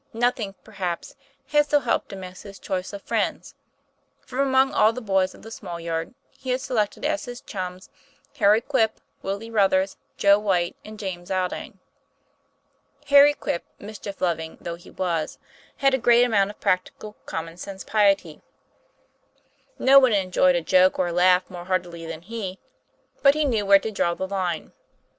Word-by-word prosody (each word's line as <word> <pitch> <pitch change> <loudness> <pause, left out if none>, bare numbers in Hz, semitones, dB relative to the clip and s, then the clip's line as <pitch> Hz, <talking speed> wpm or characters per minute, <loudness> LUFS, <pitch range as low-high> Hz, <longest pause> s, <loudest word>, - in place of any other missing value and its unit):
Noth 240 +2 +1
ing, 200 -3 -5
perhaps, 190 -5 -5 0.3
had 295 0 +3
so 295 - +4
helped 245 -4 -1
him 195 -1 -7
as 185 0 -9
his 200 -1 -11
choice 185 -1 -4
of 200 -1 -8
friends. - - -2 0.7
From 255 - -6
among 270 -1 +3
all 215 - +5
the 240 - -6
boys 195 -5 0
of - - -17
the 225 - -10
small 175 -6 -7
yard, 165 +5 -4 0.2
he 260 - -10
had 250 0 +1
selected 220 -1 -2
as 305 0 -1
his 245 -1 -7
chums 185 -4 -7 0.5
Harry 210 +1 +5
Quip, 230 -6 0 0.2
Willie 200 +4 -4
Ruthers, 195 -3 +2 0.2
Joe 200 0 +5
Whyte, 180 -4 0
and 215 0 -10
James 185 -3 -6
Aldine. 185 -1 -3 1.3
Harry 285 +1 +7
Quip, 170 - -3
mischief 205 -1 -9
loving 160 -3 -1
though 170 - -5
he 170 +1 -12
was, 170 -4 -2 0.4
had 275 -1 +3
a 265 - +2
great 240 0 +5
amount 205 -5 +2
of 210 - -11
practical, 195 +3 -2
common 165 0 -5
sense 190 +1 -8
piety. 195 -7 +1 1.4
No 275 +1 +7
one 255 -4 +4
enjoyed 185 -2 +3
a 175 - +1
joke 185 +3 +4
or 180 -1 +1
a - - -4
laugh 180 +1 +4
more 175 -2 -9
heartily 175 -3 -2
than 165 0 -7
he, 195 -2 -5 0.6
but 280 0 +6
he 305 -1 +1
knew 220 -7 0
where 200 0 +8
to 220 +3 -4
draw 170 -4 0
the 190 - -4
line. 185 -4 -3
195 Hz, 170 wpm, -24 LUFS, 180-230 Hz, 1.4 s, where